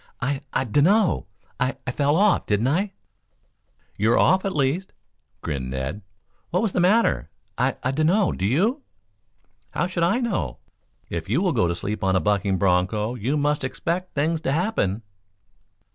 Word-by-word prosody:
"I 135 +2 -1
I - - +1
dunno, 165 - +2 0.3
I 130 +1 0
I 130 - -1
fell 145 +3 +1
off, 200 +2 +3
didn't 105 +5 +1
I?" 190 +7 0 1.0
"You're 110 +3 +3
off, 190 +1 +4
at 195 - -2
least," 150 +7 0 0.5
grinned 70 -5 -3
Ned. 65 +10 -4 0.5
"What 180 +5 0
was 220 - +1
the - - -1
matter?" 185 - +3 0.3
"I - - +1
I 130 - +1
dunno; 165 +8 +2
do 95 - -1
you?" 210 - +1 0.9
"How - - -1
should 180 -1 -3
I 180 +9 +3
know? 200 - -2 0.5
If 85 +2 -4
you 125 +9 +2
will 180 -3 +1
go 110 -8 +2
to 85 - -1
sleep 100 +5 -4
an 95 -1 +2
a - - +4
bucking 100 -2 +1
broncho, 95 +5 +1
you 125 +5 -1
must 145 0 0
expect 170 +7 -3
things 155 +3 0
to 135 - -1
happen." 140 - 0
140 Hz, 165 wpm, -24 LUFS, -, 1.0 s, off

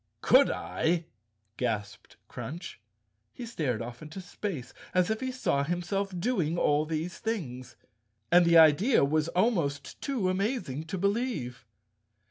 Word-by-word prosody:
"Could - - +6
I?" 165 0 -1 0.5
gasped 110 -5 -4
Crunch. 170 +5 -7 0.6
He 245 - -6
stared 140 - -2
off 120 +1 -8
into 155 +4 -8
space 180 -7 -5 0.2
as 180 +3 +3
if 220 - -1
he 260 0 -2
saw 195 - 0
himself 175 +5 -2
doing 175 -7 0
all 150 -1 +2
these 165 +2 -3
things, 140 - -4 0.6
and 175 0 +7
the 170 0 +5
idea 165 - +6
was 155 +2 +1
almost 170 - 0
too 255 -9 -1
amazing 185 - -1
to 180 +4 -4
believe. 200 - -2
170 Hz, 130 wpm, -29 LUFS, 145-200 Hz, 0.6 s, and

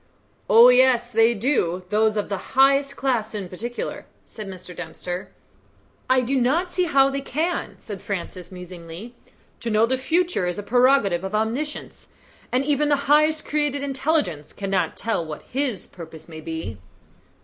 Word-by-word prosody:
"Oh, 230 +3 +9
yes; 250 -1 +4
they 225 +1 +4
do 185 - 0
those 215 +1 +2
of 210 - -1
the 200 +3 -6
highest 275 +1 +4
class 235 -6 -1
in 200 -3 -4
particular," 235 +7 -5 0.2
said 215 -3 -9
Mr. 185 -2 -9
Dempster. 175 +2 -6 0.8
"I 260 0 +4
do 260 +1 0
not 330 +9 +1
see 365 - +2
how 275 -4 +4
they 275 0 -2
can," 320 +6 -2
said 200 -4 -8
Francis 185 -2 -5
musingly. 180 +4 -9 0.5
"To 235 - -3
know 215 +1 +4
the 260 +2 -1
future 335 - +1
is 175 - -2
a 205 - -4
prerogative 245 -6 +3
of 190 +2 -3
Omniscience, 240 +8 -3 0.4
and 255 +2 +1
even 295 0 +1
the 285 -1 +1
highest 305 +1 +4
created 295 -2 0
intelligence 265 - -1
cannot 195 -4 -1
tell 225 -7 -1
what 155 -2 -7
His 260 -7 -2
purposes 160 -2 -12
may 160 -2 -9
be." 160 - -6
230 Hz, 160 wpm, -23 LUFS, 185-275 Hz, 0.8 s, Oh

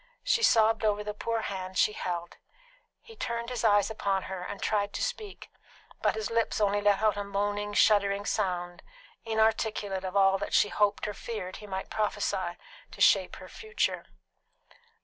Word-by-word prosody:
She 460 - +2
sobbed 225 - +4
over 210 -1 +1
the 210 0 -4
poor 230 +2 -2
hand 190 -2 -5
she 210 - +3
held. 175 -3 -4 0.7
He 450 - -14
turned 235 - -4
his 240 -2 -3
eyes 205 -1 +4
upon 195 -3 -1
her 190 -1 -6
and 195 +2 -6
tried 205 -1 0
to - - -2
speak, 445 -5 -5 0.5
but - - +2
his 220 0 -3
lips 230 -1 0
only 205 -1 +2
let 205 0 +2
out 215 -1 +3
a 205 - -2
moaning, 205 +1 -2
shuddering 200 -1 +3
sound, 180 -4 -2 0.4
inarticulate 220 -3 0
of 190 +1 -2
all 195 0 +4
that - - -2
she 205 - +4
hoped 205 0 +1
or 210 - -3
feared 200 -4 -6
he 210 - -11
might 190 -1 -5
prophesy 215 -1 -1 0.3
to - - -14
shape - - +4
her - - -11
future. 440 +1 -2
205 Hz, 170 wpm, -29 LUFS, 195-220 Hz, 0.7 s, sobbed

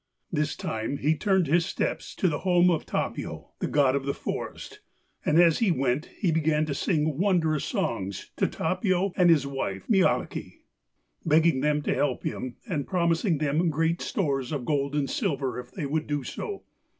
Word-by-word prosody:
This 150 -3 0
time 110 +5 -3
he 155 +4 +2
turned 190 +1 +2
his 170 +4 +3
steps 180 - -3
to 185 - +1
the 150 -4 0
home 180 -1 +4
of 165 - -1
Tapio, - - -3
the - - -1
god 140 -3 +3
of 140 0 -2
the 140 - 0
forest, - - -5 0.4
and 155 +2 +3
as 170 -2 +5
he 225 - +3
went 135 -2 0
he 185 -5 +1
began 155 -1 +2
to 150 - -2
sing 150 -1 0
wondrous 170 -6 +2
songs 100 -4 -3
to - - +2
Tapio 185 +2 0
and 180 -1 +5
his 155 -5 +4
wife 135 -9 -4
Mielikki, 195 -4 +1 0.6
begging 160 -2 +4
them 150 0 +1
to - - +1
help 140 -4 0
him, 130 -2 -4
and 155 - -2
promising 170 0 +1
them 155 +4 +1
great 165 +2 0
stores 135 - -1
of 140 -5 -3
gold 140 -1 0
and 145 -2 +1
silver 140 - -1
if 125 0 -9
they 160 0 -5
would 155 +3 -1
do 145 -2 -1
so. 400 - -6
155 Hz, 180 wpm, -27 LUFS, 140-175 Hz, 0.6 s, as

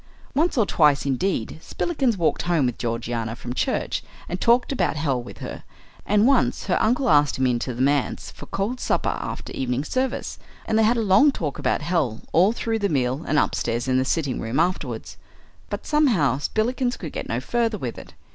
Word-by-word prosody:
Once 315 +2 +1
or 225 - +4
twice, 150 -7 +3
indeed, 140 - -1
Spillikins 270 - -1
walked 170 -3 +1
home 170 -6 +1
with 125 -2 -2
Georgiana 115 -1 -2
from 120 0 -6
church - - -1 0.3
and 180 +1 -4
talked 240 +3 +3
about 270 - 0
hell 140 -4 0
with 120 - -11
her; - - -7 0.4
and 210 +1 +4
once 270 -1 +2
her 185 - +1
uncle 250 +5 +2
asked 145 -2 +4
him 130 - +1
into 125 0 0
the 125 +1 -1
manse 140 -1 0
for - - -12
cold 215 +6 -2
supper - - 0
after - - -6
evening 130 +1 -1
service, 260 - -2 0.3
and 220 0 +1
they - - +5
had 235 +3 +3
a 230 - +1
long 210 +9 +5
talk 155 - -4
about - - 0
hell 150 -10 0
all 185 +6 +5
through 225 -1 -2
the 200 -1 0
meal 130 0 0
and 155 - +1
upstairs 120 -3 0
in 130 0 +2
the - - +2
sitting 140 -1 -1
room 115 +6 -2
afterwards. 180 +3 -2 0.5
But - - -5
somehow 215 - +2
Spillikins 245 - -1
could 160 -5 -7
get - - -5
no 115 - 0
further 230 - 0
with 125 - -5
it. - - -14
165 Hz, 195 wpm, -23 LUFS, -, 0.5 s, they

